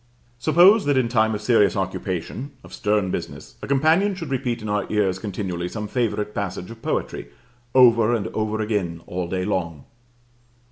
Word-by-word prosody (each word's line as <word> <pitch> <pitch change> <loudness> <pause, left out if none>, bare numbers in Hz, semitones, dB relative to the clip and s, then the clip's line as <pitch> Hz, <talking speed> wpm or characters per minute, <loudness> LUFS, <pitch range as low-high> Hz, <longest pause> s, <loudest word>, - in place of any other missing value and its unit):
Suppose 175 - +5
that 145 -2 +2
in 130 -2 +2
time 110 -2 +2
of 105 - -6
serious 105 -4 +3
occupation, 95 - -4
of - - -14
stern 105 -3 0
business, - - -6
a - - -6
companion 160 +9 +3
should 165 -6 -7
repeat 120 -3 -2
in - - -5
our 105 0 -2
ears 100 -3 +1
continually 90 -4 -4
some 105 +1 -5
favorite 105 -3 -1
passage 95 -1 -4
of 115 -1 -12
poetry, - - -3 0.5
over 120 -2 +6
and 105 -3 -2
over 110 0 -2
again 95 -6 -2
all 90 0 -4
day 90 0 -2
long. 85 -7 -3
105 Hz, 170 wpm, -23 LUFS, 95-125 Hz, 0.5 s, over